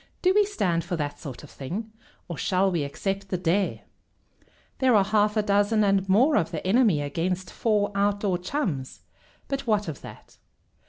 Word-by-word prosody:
Do 370 0 +4
we 415 +1 +4
stand 180 - 0
for 175 +2 -3
that 145 -3 -4
sort 140 -3 -8
of 150 - -13
thing, 195 +12 -6 0.4
or 170 - -5
shall 190 +3 +1
we 170 -4 0
accept 195 +7 -3
the 185 - -1
dare?" 180 +3 0 1.0
"There 260 -3 +4
are 200 - +5
half 210 +1 +2
a 215 - +2
dozen 205 +1 +2
and 195 -1 +2
more 255 +10 +4
of 165 - +1
the 165 -1 -5
enemy 195 - +3
against 175 +5 -2
four 210 -3 +1
Outdoor 200 -2 0
Chums, 180 - -3 0.5
but 275 -2 -4
what 210 -3 +1
of 155 -4 -6
that? - - -13
195 Hz, 175 wpm, -26 LUFS, 170-215 Hz, 1.0 s, are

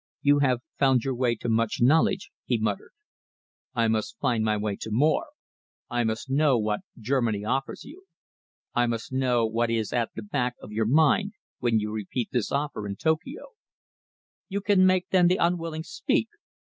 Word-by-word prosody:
"You 145 0 +5
have 130 -4 +2 0.2
found 130 -4 +3
your 135 - -1
way 120 -1 +1
to 120 - -7
much 115 -1 +1
knowledge,", 155 +9 +3
he 120 - +1
muttered. 110 -2 -2 0.9
"I 115 -1 +2
must 110 - -1
find 120 - 0
my 110 -1 +1
way 105 -1 -2
to - - -5
more. 150 - +2 0.6
I 120 0 +1
must 110 +3 -2
know 140 -1 +3
what 105 -1 -1 0.2
Germany 115 -3 0
offers 135 +4 -2
you. 370 +5 -13 0.7
I 120 0 +2
must 115 +1 -3
know 125 -3 +2
what 115 +1 0
is 115 -2 -1
at 120 -2 0
the 110 - -6
back 125 +3 -1
of - - -11
your 110 0 0
mind 160 - +3 0.3
when 120 -2 +2
you 105 0 -3
repeat 110 +3 -3
this 120 -5 -1
offer 140 -7 -2
in 100 - -4
Tokio." 160 - -2 1.0
"You 200 +1 -2
can 195 -2 +4
make, 185 -1 +2
then, 180 -2 +5
the 180 +2 +3
unwilling 165 -2 -1
speak?" 450 - -1
125 Hz, 175 wpm, -26 LUFS, 110-155 Hz, 1.0 s, You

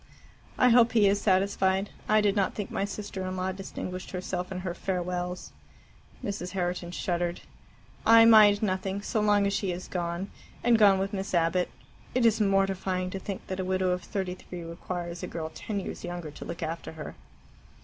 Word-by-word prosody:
"I 250 - +5
hope 235 -1 +5
he 215 -3 +5
is 200 +1 +2
satisfied. 190 0 +2 0.2
I 215 0 +5
did 205 -1 +2
not 195 -2 +1
think 205 - -4
my 195 - 0
sister 200 -1 -5
in 185 0 -4
law 185 +1 -1
distinguished 185 -1 -6
herself 180 0 -4
in 185 -1 -4
her 180 -2 -3
farewells." 180 -1 -3 0.7
Mrs. 200 -3 -4
Herriton 175 -2 -2
shuddered. 175 -1 -2 0.6
"I 225 0 +8
mind 215 -2 +7
nothing, 195 0 -1
so 215 - 0
long 205 -1 +3
as 200 - +1
she 200 -1 -1
has 180 +1 -4
gone 175 +1 -3 0.3
and 235 -2 +4
gone 200 -2 +7
with 195 +2 -2
Miss 195 -1 -2
Abbott. 170 +2 +2 0.5
It 250 -2 +3
is 225 -1 +4
mortifying 195 -2 +1
to 195 - -4
think 195 0 -6
that 190 0 -5
a - - 0
widow 185 0 +1
of 180 0 -1
thirty 185 0 -3
three 180 -1 -9
requires 170 +1 -5
a - - -4
girl 160 -1 -5
ten 210 -2 -4
years - - -6
younger 175 -3 -5
to - - -9
look 170 0 -5
after 165 +1 -5
her." 155 -1 -7
190 Hz, 190 wpm, -28 LUFS, 180-200 Hz, 0.7 s, I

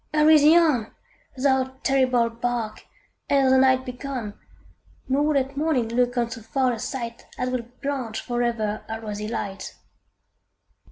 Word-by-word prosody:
hurry 305 0 +6
thee 305 +3 +6
on, 290 -10 +2 0.5
Thou 265 -1 +1
terrible 255 -3 +3
bark, 230 -2 -3 0.4
ere 270 -2 +4
the 260 - +6
night 260 0 +4
be 250 - -4
gone, 250 -5 -5 0.7
Nor 290 +3 +1
let 270 0 0
morning 280 -6 0
look 245 +1 0
on 240 -1 +2
so 230 0 -8
foul 255 +3 0
a 230 - -5
sight 235 -2 -5
As 250 0 -2
would 245 0 -5
blanch 260 -6 -3
for 240 0 -3
ever 220 -3 -1
her 225 0 -4
rosy 210 -1 -5
light! 200 -4 -5
250 Hz, 155 wpm, -24 LUFS, 230-270 Hz, 0.7 s, hurry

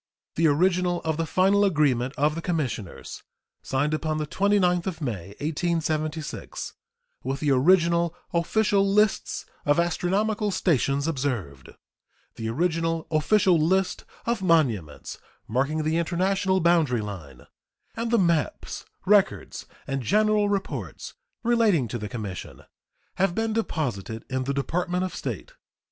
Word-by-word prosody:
The 165 +1 +3
original 175 +3 +2
of 160 -1 -1
the 165 -1 -1
final 195 +5 +3
agreement 145 -8 +2
of 150 +2 +2
the 165 - -4
commissioners, 135 - -4 0.4
signed 145 +3 0
upon 155 0 -1
the 155 - -1
29th 185 0 +2
of 175 -4 -3
May, 100 - -5
1876, 155 -1 -2 0.5
with 135 +2 -2
the 145 -1 +1
original 170 +4 +3 0.2
official 200 +4 +2
"lists 205 +1 +1 0.2
of 145 +2 +2
astronomical 205 +5 0
stations 140 -6 +1
observed," 125 - -3 0.6
the 110 0 -4
original 165 +4 0
official 175 +3 +3
"list 185 +4 +1 0.2
of 235 -3 0
monuments 125 - 0 0.3
marking 140 +7 0
the 155 +2 +1
international 190 +2 +1
boundary 160 -9 +3
line," 100 -8 -8 0.5
and 230 +1 -2
the 235 - +3
maps, 170 - 0 0.2
records, 200 0 +2 0.2
and 135 -1 -2
general 210 - +2
reports 200 -1 -4 0.3
relating 225 - +3
to 120 +2 -4
the 105 -1 -5
commission, 100 -5 -7 0.5
have 190 -2 +1
been 225 0 0
deposited 120 - -3
in 130 0 -1
the 140 - -1
Department 180 +6 -1
of 185 - -3
State. - - -5
165 Hz, 125 wpm, -25 LUFS, 140-190 Hz, 0.6 s, The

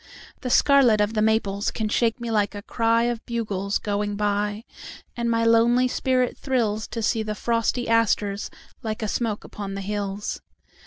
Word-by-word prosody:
The 255 - -3
scarlet 255 -4 +5
of 210 +1 +1
the 215 - +1
maples 215 -2 +1
can 220 - -2
shake 230 +2 +1
me 235 -1 -4
like 205 -2 +1
a 205 - -7
cryOf 230 +1 +1
bugles 205 -4 -1
going 205 0 -2
by. 205 +1 -1 0.5
And 235 -1 -1
my 230 0 +2
lonely 235 +2 +4
spirit 255 -1 0
thrillsTo 225 -3 -1
see 225 +1 +1
the 215 -1 -3
frosty 235 +2 0
asters 210 -3 +1 0.3
like 220 0 -4
a - - -1
smoke 215 -1 -2
upon 195 -1 -6
the 195 - -4
hills. 205 0 -3
220 Hz, 160 wpm, -24 LUFS, 205-235 Hz, 0.5 s, scarlet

